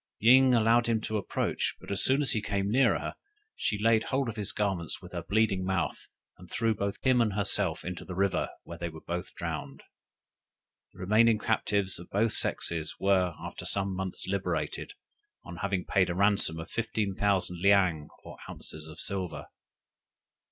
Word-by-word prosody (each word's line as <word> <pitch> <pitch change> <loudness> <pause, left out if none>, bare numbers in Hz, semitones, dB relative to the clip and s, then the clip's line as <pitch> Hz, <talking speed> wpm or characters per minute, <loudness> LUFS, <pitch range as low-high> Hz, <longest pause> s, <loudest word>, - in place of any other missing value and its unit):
Ying 130 +3 +6
allowed 115 +1 +4
him 115 -1 +2
to 110 0 -2
approach, 100 - -1
but - - -9
as 100 - +2
soon 135 +3 +4
as 135 - +3
he 110 - +1
came 100 -1 -1
near 120 -7 +4
her, - - -5 0.4
she 105 - 0
laid 110 +1 +3
hold 135 -2 0
of 115 - -6
his 105 -3 -1
garments 95 -6 -2
with - - -12
her - - -4
bleeding 100 -3 +1
mouth, 95 -1 -2 0.3
and - - -13
threw 115 -1 +1
both 100 -1 -3
him 130 -2 +4
and 110 -3 +1
herself 100 0 0
into 90 0 -5
the 90 - -7
river, 95 0 +1
where 85 0 -9
they 85 0 -3
were 80 -1 -11 0.3
drowned. - - -5 1.1
The - - -17
remaining 110 +4 +4
captives 100 -4 0
of 85 - -11
both 110 +3 +1
sexes 80 -2 -2
were 95 -3 +2
after - - -7
some 100 -1 +1
months 95 -1 -4
liberated, 100 0 -2 0.5
on 90 - -8
having 95 -1 -2
paid 95 -2 +2
a 85 - -2
ransom 100 -4 +3
of 80 +3 -8
fifteen 110 -3 -1
thousand 95 -3 0
leang 90 -6 +3 0.2
or - - -10
ounces 80 0 -7
of 80 - -11
silver. 95 -3 -4
100 Hz, 175 wpm, -29 LUFS, 90-110 Hz, 1.1 s, Ying